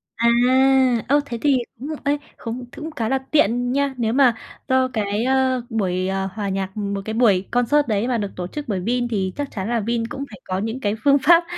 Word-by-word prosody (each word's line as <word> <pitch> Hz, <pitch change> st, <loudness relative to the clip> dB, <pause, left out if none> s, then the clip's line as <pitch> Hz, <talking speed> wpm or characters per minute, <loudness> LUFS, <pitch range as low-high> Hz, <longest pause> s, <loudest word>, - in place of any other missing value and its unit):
À, 235 Hz, 0 st, +3 dB, 0.8 s
ơ, 285 Hz, +3 st, +4 dB
thế 235 Hz, -4 st, -5 dB
thì 280 Hz, -3 st, +3 dB, 0.2 s
đúng 275 Hz, +6 st, -7 dB
rồi. 310 Hz, -, -4 dB
Ê, 290 Hz, +1 st, +2 dB, 0.2 s
không 245 Hz, +1 st, -6 dB
th -, -, -14 dB
cũng 315 Hz, +1 st, -6 dB
khá 225 Hz, -7 st, -2 dB
là 270 Hz, -, +2 dB
tiện 245 Hz, -4 st, +2 dB
nha. 280 Hz, 0 st, 0 dB
Nếu 230 Hz, -1 st, 0 dB
mà 255 Hz, -4 st, +4 dB, 0.3 s
do 260 Hz, 0 st, +3 dB
cái, 210 Hz, 0 st, -1 dB
ơ, 260 Hz, -1 st, +2 dB
buổi, 185 Hz, -5 st, -1 dB
ờ, 190 Hz, 0 st, -1 dB
hòa 200 Hz, -1 st, -3 dB
nhạc, 195 Hz, +1 st, -3 dB
một 200 Hz, -1 st, -2 dB
cái 220 Hz, -, -3 dB
buổi 205 Hz, -5 st, +3 dB
concert 265 Hz, +4 st, +2 dB
đấy 215 Hz, +2 st, 0 dB
mà 245 Hz, -2 st, +1 dB
được 205 Hz, -2 st, -3 dB
tổ 180 Hz, -1 st, -4 dB
chức 295 Hz, +8 st, -7 dB
bởi 195 Hz, -4 st, -1 dB
Vin 240 Hz, +5 st, 0 dB
thì 190 Hz, -5 st, -2 dB
chắc 285 Hz, -1 st, -4 dB
chắn 195 Hz, +1 st, -4 dB
là 235 Hz, -1 st, +1 dB
Vin 230 Hz, +1 st, -1 dB
cũng 275 Hz, -, -5 dB
phải 210 Hz, -, -12 dB
có 185 Hz, 0 st, -3 dB
những 225 Hz, +5 st, -3 dB
cái 210 Hz, -3 st, -1 dB
phương 280 Hz, 0 st, +5 dB
pháp, 340 Hz, 0 st, +6 dB
235 Hz, 240 wpm, -22 LUFS, 205-265 Hz, 0.8 s, pháp